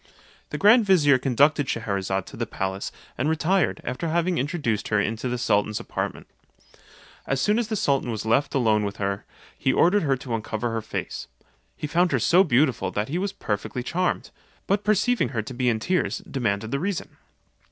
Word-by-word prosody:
The 150 - -4
grand 220 +7 +6
vizier 150 -9 +4
conducted 140 +3 +3
Schcherazade 100 -4 -2
to - - -11
the - - -3
palace, 95 0 -3 0.3
and 140 +5 +1
retired, 170 +4 +1
after 125 +7 -3
having 170 +2 +1
introduced 130 - -1
her 105 - +2
into 115 +4 -1
the 125 - -1
sultan's 105 -2 +1
apartment. - - -4 1.0
As 135 - 0
soon 210 - +2
as 235 - -1
the 220 - -2
sultan 140 - +1
was 110 -2 -3
left 125 +7 +1
alone 110 -5 +3
with 100 -1 -4
her, 100 0 -2 0.3
he 130 - +1
ordered 185 +9 +4
her 140 -4 +1
to 125 -1 -6
uncover 115 +1 -2
her 115 0 -2
face: - - -5 0.5
he - - -4
found 175 +4 +2
her - - +3
so 180 +3 +5
beautiful 125 - +2
that 105 +5 -2
he 170 +5 -1
was 200 +1 -1
perfectly 110 - -3
charmed; 180 +7 -1 0.3
but 200 +1 +1
perceiving 215 +4 +2
her 110 - 0
to 130 - -8
be 125 0 +1
in 110 -2 0
tears, 180 +10 0
demanded 110 -4 -2
the 140 - 0
reason. 185 +2 -3
130 Hz, 185 wpm, -25 LUFS, 110-170 Hz, 1.0 s, grand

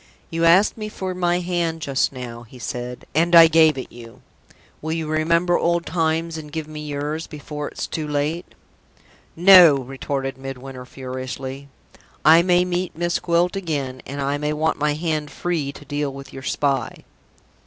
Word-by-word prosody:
"You 165 0 0
asked 185 +7 +5
me 215 0 -4
for 190 -3 -4
my 175 -1 0
hand 170 -2 -1
just 135 -1 +1
now," 120 -3 -8
he 120 +2 -14
said, 125 +1 -6
"and 170 +3 +3
I 165 -1 +11
gave 160 -2 +4
it 130 - -6
you. 120 +1 -13 0.6
Will 160 +1 -3
you 160 -1 -3
remember 170 +3 +2
old 170 0 +1
times, 165 0 -1
and 150 -1 -10
give 155 0 -4
me 155 -1 -8
yours, 150 +2 -3
before 150 -1 -6
it's - - -5
too 155 -2 -4
late?" 150 +4 -2 0.8
"No!" 175 -3 +8
retorted 135 0 -4
Midwinter, 135 -1 -8
furiously. 130 +1 -6 0.6
"I 160 +2 +8
may 180 0 +3
meet 180 -1 -3
Miss 175 0 0
Gwilt 175 +1 +1
again, 145 -9 -3
and 140 +1 -6
I 140 +1 -1
may 150 +1 -1
want 155 +1 0
my 150 0 +1
hand 155 -2 -2
free 155 -2 -2
to 145 - -13
deal 145 0 -2
with 135 -1 -11
your 135 - -8
spy!" 135 0 -1
150 Hz, 170 wpm, -22 LUFS, 135-170 Hz, 0.8 s, I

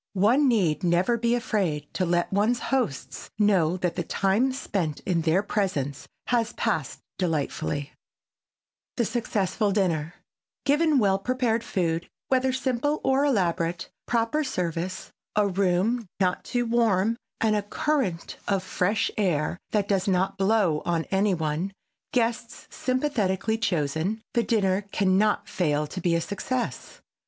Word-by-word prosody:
One 245 +9 +4
need 195 -9 +2
never 180 +7 +3
be 235 +1 +1
afraid 185 -11 -1
to 185 - 0
let 175 +2 +1
one's 215 +5 +2 0.2
hosts 235 - -2
know 185 -5 +3
that 180 -1 -1
the - - -1
time 205 +7 +1
spent 185 - -2
in 175 -3 0
their 165 +5 +2
presence 185 -11 -2 0.2
has 235 -2 +1
passed 165 - -2 0.2
delightfully. 155 -4 -1
[Sidenote: 145 - -11 1.1
THE 235 - +2
SUCCESSFUL 210 -3 0
DINNER] 170 -5 0 0.5
Given 300 +1 +3
well 195 -5 +3
prepared 235 0 0
food, 170 -2 -1 0.2
whether 260 0 +2
simple 260 +3 0
or 265 +1 +3
elaborate, 175 -9 0 0.2
proper 235 +6 +1
service, 180 - -3 0.2
a 210 -1 +3
room 195 +4 +1
not 185 -2 +1
too 245 -1 -1
warm 230 -2 +2 0.2
and 220 -1 +2
a 210 - +1
current 205 - -1
of 195 -2 +1
fresh 200 +4 0
air 175 -3 0
that 205 -2 0
does 195 -1 +1
not 190 +1 +1
blow 195 -5 +2
on 170 -2 0
any 195 0 +2
one, 160 +4 -2 0.4
guests 230 -1 -1
sympathetically 225 -6 0
chosen, 175 +2 -1
the 235 - +3
dinner 200 -4 +1
can 190 -2 +2
not 210 0 +1
fail 150 -4 0
to 180 +5 -6
be 170 0 +2
a 170 - +1
success. 240 +7 -4
195 Hz, 140 wpm, -26 LUFS, 175-230 Hz, 1.1 s, One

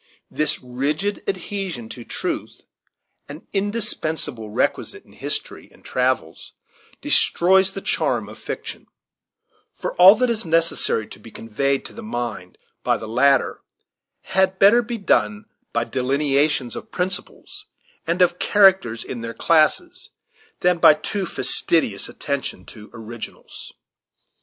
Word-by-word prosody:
This 155 - 0
rigid 145 +11 -2
adhesion 190 - -4
to 120 - -9
truth, - - -5 0.7
an 150 +3 -10
indispensable 160 - -2
requisite 105 - -2
in - - -21
history - - -4
and - - -22
travels, 125 -10 -2 0.5
destroys 190 +2 +4
the 195 - -6
charm - - 0
of - - -12
fiction; - - -7 0.9
for - - -4
all 185 +3 +9
that 250 +1 +1
is 225 -1 -1
necessary 165 - +1
to - - -13
be 115 - -13
conveyed 135 +6 -2
to - - -9
the 230 - -9
mind 120 - -5 0.3
by - - +2
the 110 - -8
latter 135 +5 +2 0.6
had 190 0 +1
better 205 +6 +6
be 235 +1 -5
done 105 - +1 0.3
by - - 0
delineations 140 0 0
of - - -8
principles, 195 - -4 0.4
and 175 +2 +3
of 175 0 +1
characters 190 - +4
in 120 - -7
their 115 0 -6
classes, 345 - +1 0.5
than 180 -1 +2
by 155 - +8
a 150 - -11
too 195 +2 -3
fastidious 155 -11 +1
attention 140 -10 -4
to 105 -2 -13
originals. 115 0 -10
155 Hz, 130 wpm, -22 LUFS, 120-195 Hz, 0.9 s, all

